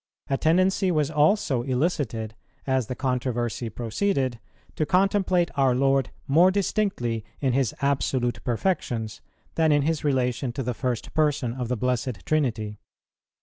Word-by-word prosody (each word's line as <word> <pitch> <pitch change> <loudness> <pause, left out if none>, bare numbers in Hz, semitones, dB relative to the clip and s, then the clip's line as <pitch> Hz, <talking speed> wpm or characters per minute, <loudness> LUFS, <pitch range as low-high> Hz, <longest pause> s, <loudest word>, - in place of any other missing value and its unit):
A - - +3
tendency 185 +4 +3
was 155 -5 +1
also 150 - +2
elicited, 125 -5 -1 0.3
as 130 -4 0
the 125 - -4
controversy 120 -3 -2
proceeded, 125 - -1 0.4
to - - 0
contemplate 185 0 +2
our 135 -3 +3
Lord 135 +1 +2 0.2
more 165 +7 +5
distinctly 190 - -1 0.2
in 135 -3 +1
His 130 -4 +1
absolute 130 -3 0
perfections, 120 - -2 0.3
than 160 -1 +2
in 145 -1 +3
His 160 0 -1
relation 130 -3 0
to 135 +1 -3
the 125 +1 -2
First 125 -2 -3
Person 145 -6 +1
of 125 -1 -4
the 125 +1 -1
Blessed 125 -3 -2
Trinity. 115 -9 -1
135 Hz, 140 wpm, -25 LUFS, 120-155 Hz, 0.4 s, more